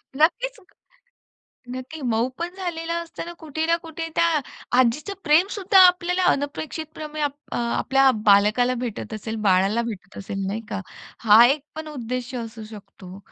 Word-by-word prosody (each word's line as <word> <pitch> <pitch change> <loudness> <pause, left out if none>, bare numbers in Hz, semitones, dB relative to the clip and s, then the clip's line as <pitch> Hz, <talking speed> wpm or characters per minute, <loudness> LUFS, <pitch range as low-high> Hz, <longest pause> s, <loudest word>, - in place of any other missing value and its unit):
नक्कीच, 475 - +1 1.2
नक्की. 260 +5 -8
मऊ 235 -2 +1
पण 340 +1 -3
झालेला 335 -3 -3
असतं 335 0 -8
ना, 345 - -7
कुठे 315 0 -3
ना 335 +1 +3
कुठे 325 0 -5
त्या - - +4 0.5
आजीचं 255 - +1
प्रेम 325 +4 +4
सुद्धा 390 0 +4
आपल्याला 360 +1 +1
अनपेक्षितपणे 305 +1 -5
अप 290 -1 0 0.2
अ, - - -3
आपल्या 265 +3 +2 0.2
बालकाला 215 +5 +4
भेटत 225 0 -6
असेल, 220 +1 -5
बाळाला 195 +4 +3
भेटत 195 -1 -11
असेल 195 0 -4
नाही 210 +3 -3
का? 200 - -3 0.4
हा 225 +1 +7
एक 280 +3 +1
पण 315 0 -6
उद्देश्य 255 -2 -5
असू 225 -1 -7
शकतो. 195 -3 -12
270 Hz, 150 wpm, -23 LUFS, 225-325 Hz, 1.2 s, हा